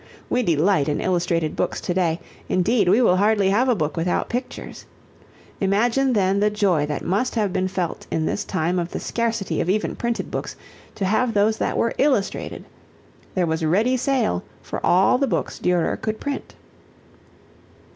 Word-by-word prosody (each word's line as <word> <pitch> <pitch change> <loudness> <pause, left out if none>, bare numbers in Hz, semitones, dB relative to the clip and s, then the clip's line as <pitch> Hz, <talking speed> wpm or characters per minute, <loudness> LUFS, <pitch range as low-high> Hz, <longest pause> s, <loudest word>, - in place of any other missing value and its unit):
We 250 - +2
delight 170 - +2
in 145 - -1
illustrated 170 -3 0
books - - -1
to 175 - -2
day, 175 -2 +1 0.3
indeed 200 +1 +2
we 220 +7 +5
will 185 -5 +4
hardly 205 -1 +3
have 245 +6 +2
a 245 - +4
book 155 -5 -2
without 170 +2 -1
pictures. 250 +2 -5 0.7
Imagine 235 +7 +2
then 195 -2 +2
the 210 +1 +3
joy 190 -8 +1
that 150 -2 -4
must 205 +9 0
have 210 -5 0
been 185 0 0
felt 180 -2 -3
in 160 - -1
this - - -1
time 180 0 -1
of 170 0 -3
the - - -5
scarcity 230 -4 -1
of 175 - -2
even 210 +3 0
printed 235 -1 -3
books - - -4 0.4
to 195 - -2
have 225 +4 +1
those 215 +2 +3
that - - -1
were 230 - +1
illustrated. 265 -9 0 0.7
There 185 -2 +2
was 160 0 -1
ready 210 +11 +2
sale 255 - 0 0.2
for - - -6
all 190 +7 +4
the 275 - +2
books - - -2
Durer 180 -2 +1
could 220 0 -3
print. 285 -1 -5
195 Hz, 175 wpm, -22 LUFS, 175-230 Hz, 0.7 s, we